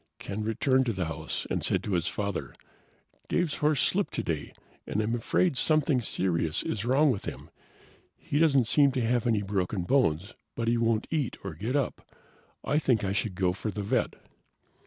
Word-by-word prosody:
Ken 100 +2 -5
returned 130 +4 +2
to 115 - +1
the 95 -2 -2
house 80 -1 -4
and - - -1
said - - +1
to - - -4
his 85 -1 +1
father, 100 -3 -3 0.7
"Dave's 175 -4 0
horse 150 -2 +2
slipped 200 +1 0
today, 75 -3 -3 0.4
and - - -1
I'm 110 +2 0
afraid 135 +7 +1
something 155 -2 +3
serious 85 -7 0
is 110 0 -3
wrong 135 +4 +4
with 100 - -4
him. - - -7 0.7
He 145 - -2
doesn't 140 -6 +4
seem 140 +4 +4
to 130 - 0
have 120 0 +1
any 110 -3 +2
broken 95 -1 -1
bones, 100 - +1 0.2
but 115 -1 -2
he 120 - +3
won't 115 -1 +1
eat 150 -7 -1
or 100 - -5
get 115 +7 -3
up. 140 -3 -2 0.5
I 150 - +1
think 125 -8 +1
I 95 - 0
should 100 -2 -1
go 90 -2 +1
for 105 +3 -4
the 105 0 -4
vet." 100 - 0
115 Hz, 185 wpm, -28 LUFS, 95-135 Hz, 0.7 s, wrong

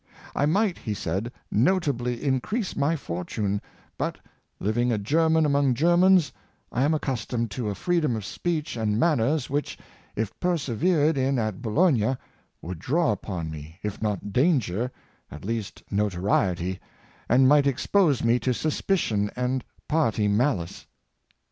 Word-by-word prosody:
" - - -18
I 145 - +2
might," 195 +3 +1
he 105 - -3
said, 95 +6 -3 0.2
" - - -47 0.2
notably 125 -10 -1
increase 180 - -1
my 145 +4 +1
fortune, 100 - -3 0.4
but, - - -2 0.4
living 120 +4 +1
a 115 - +1
German 160 +8 +2
among 140 -3 +2
Germans, 175 0 +4 0.4
I 125 - -1
am 150 +3 +3
accustomed 120 -5 -2
to 110 +1 -3
a 100 - -3
freedom 155 - +1
of 110 -3 -5
speech 165 - -2
and 110 -2 0
manners 145 -2 +2
which, 145 +1 -2 0.4
if 110 -2 -2
persevered 160 - +1
in 135 +1 +1
at 110 -3 -2
Bologna, 130 - +2 0.5
would 90 -1 -6
draw 155 - +1
upon 90 -6 -4
me, 80 +2 -9
if 105 -1 -4
not 105 -2 -2
danger, 125 - +1 0.4
at 75 +5 -10
least 110 -1 -4
notoriety, 95 -2 0 0.5
and 130 +3 +5
might 145 0 +5
expose 145 - +2
me 115 +1 +3
to 125 +1 0
suspicion 145 - 0
and 125 +1 -1 0.2
party 115 -10 +1
malice." 100 - 0
125 Hz, 140 wpm, -26 LUFS, 105-155 Hz, 0.5 s, and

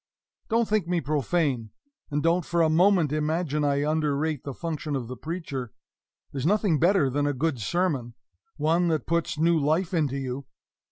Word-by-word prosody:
Don't 230 0 +2
think 210 -5 +1
me 175 -1 +1
profane, 145 -5 0 0.4
and 145 0 -1
don't 170 +2 +2
for 170 -1 +1
a 160 - +3
moment 175 -2 +4
imagine 155 0 0
I 140 0 +1
underrate 155 -1 0
the 140 - -5
function 155 -3 -3
of 125 -4 -3
the 125 - -6
preacher. 140 - -5 0.6
There's 135 -2 -4
nothing 195 -2 +2
better 175 -3 +4
than 145 +2 0
a 145 - +1
good 145 0 -1
sermon 135 - -1 0.4
one 165 +4 +2
that 160 -2 0
puts 170 -1 -1
new 165 +1 +3
life 160 +5 +1
into 145 -5 +1
you. 130 0 -5
155 Hz, 170 wpm, -26 LUFS, 140-170 Hz, 0.6 s, moment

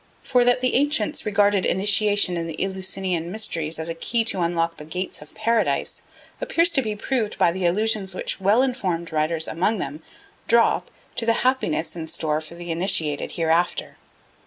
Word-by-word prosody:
For 250 -2 +3
that 245 0 +3
the 255 - +1
ancients 295 -1 +1
regarded 205 -2 +3
initiation 205 -1 +2
in 165 -1 -3
the 165 - -7
Eleusinian 190 -3 -2
mysteries 165 -7 -1
as 160 - -4
a 165 - -2
key 230 +8 0
to 205 -5 0
unlock 170 -1 0
the - - -9
gates 180 +3 -5
of 150 - -14
Paradise 225 +1 0 0.4
appears 345 -9 +2
to 270 - +2
be 215 -4 -3
proved 220 0 -2
by 170 - +4
the 180 0 0
allusions 205 0 +1
which 195 - -2
well 210 +6 +4
informed 185 -11 -2
writers 160 +1 0
among 195 +7 0
them 145 -2 -5 0.5
drop 230 +1 +3 0.3
to 230 - 0
the 230 - +5
happiness 215 -12 0
in 160 -2 -6
store 155 -1 -1
for 160 +2 -10
the 175 0 -6
initiated 165 -4 0
hereafter. 165 +1 0
190 Hz, 175 wpm, -23 LUFS, 165-220 Hz, 0.5 s, the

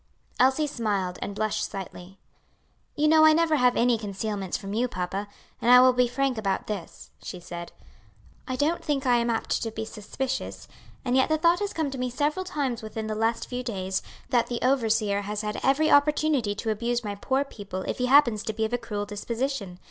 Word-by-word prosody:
Elsie 265 +4 +4
smiled, 205 -9 -2
and 200 - -4
blushed 215 0 -1
slightly. 190 -1 -7 0.8
"You 300 0 +2
know 315 0 +6
I 315 0 +8
never 320 -1 +3
have 250 -2 +3
any 240 -1 +3
concealments 200 -2 -3
from 195 0 -7
you, 240 +4 +1
papa, 190 0 -4 0.3
and 235 - +1
I 250 0 +10
will 255 0 +6
be 250 0 +3
frank 255 -1 -1
about 195 -3 -1
this," 200 -6 -7
she 180 - -7
said. 175 -1 -8 0.8
"I 255 - -2
don't 300 +6 0
think 285 -2 -1
I 245 -2 +4
apt 235 -1 -1
to 225 - -2
be 220 0 -5
suspicious, 255 +5 -5 0.4
and 250 0 +1
yet 260 +2 +3
the 315 - +3
thought 335 +2 +3
has 410 -1 -2
come 315 -4 -2
to 265 - -5
me 250 0 -1
several 295 +8 -1
times 280 -9 -2
within 220 0 -5
the 215 - -2
last 225 +2 0
few 250 0 -4
days, 190 -6 -2 0.3
that 240 -2 +2
the 240 -1 -3
overseer 225 -6 +2
has 210 +1 -3
had 210 -1 -3
every 275 +4 +3
opportunity 285 -6 +3
to 220 +1 -2
abuse 235 +2 -1
my 205 -1 -3
poor 265 +7 0
people 200 -8 -7
if - - -4
he 250 - +1
happens 250 -6 +5
to 220 - -2
be 220 +1 -1
of 220 - -4
a 245 - +1
cruel 210 -3 -4
disposition. 215 -1 -3
235 Hz, 205 wpm, -26 LUFS, 210-270 Hz, 0.8 s, I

